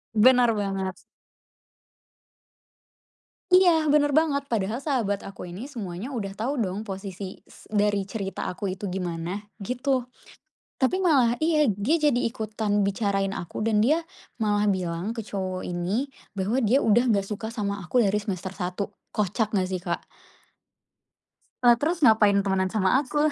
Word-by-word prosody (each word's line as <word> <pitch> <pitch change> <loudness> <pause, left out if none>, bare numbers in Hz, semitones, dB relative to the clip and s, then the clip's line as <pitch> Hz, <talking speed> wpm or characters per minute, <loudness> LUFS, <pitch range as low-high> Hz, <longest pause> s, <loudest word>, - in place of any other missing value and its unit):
Benar 245 +1 +6
banget. 195 -2 -2 2.6
Iya, 350 -4 +5
benar 290 0 +4
banget. 285 -1 +2
Padahal 225 +4 -1
sahabat 225 -9 0
aku 195 -2 -8
ini 210 +12 -8
semuanya 205 0 -6
udah 200 -6 -4
tau 255 +6 -2
dong 200 -1 -2
posisi 195 -2 -7
s - - -17
dari 205 -1 +2
cerita 195 0 -5
aku 185 +1 -4
itu 195 -1 -5
gimana, 180 0 -3 0.2
gitu. 255 +3 0 0.8
Tapi 370 +9 +1
malah 260 -9 +4
iya, 310 -2 +3
dia 220 - +1
jadi 295 -4 +3
ikutan 215 -3 -1
bicarain 195 -1 0
aku 175 - -6
dan 215 -1 +2
dia 305 +8 +3 0.4
malah 210 -1 +2
bilang 180 +1 -2
ke 230 - -5
cowok 185 -2 -4
ini 180 +9 -1 0.2
bahwa 205 +6 0
dia 235 +6 +4
udah 230 0 +4
nggak 200 -2 +1
suka 220 +2 -5
sama 200 -3 -3
aku 210 +8 +1
dari 200 -1 +2
semester 190 -2 -4
1, 180 +1 -3 0.3
kocak 210 +1 0
nggak 190 -3 +1
sih, 185 -1 -3
Kak? - - -1 1.6
Lah, 240 -1 +8
terus 325 0 +1
ngapain 215 -3 +5
temenan 190 -1 +1
sama 215 +6 +2
aku? 290 +1 -5
210 Hz, 145 wpm, -26 LUFS, 195-250 Hz, 2.6 s, Lah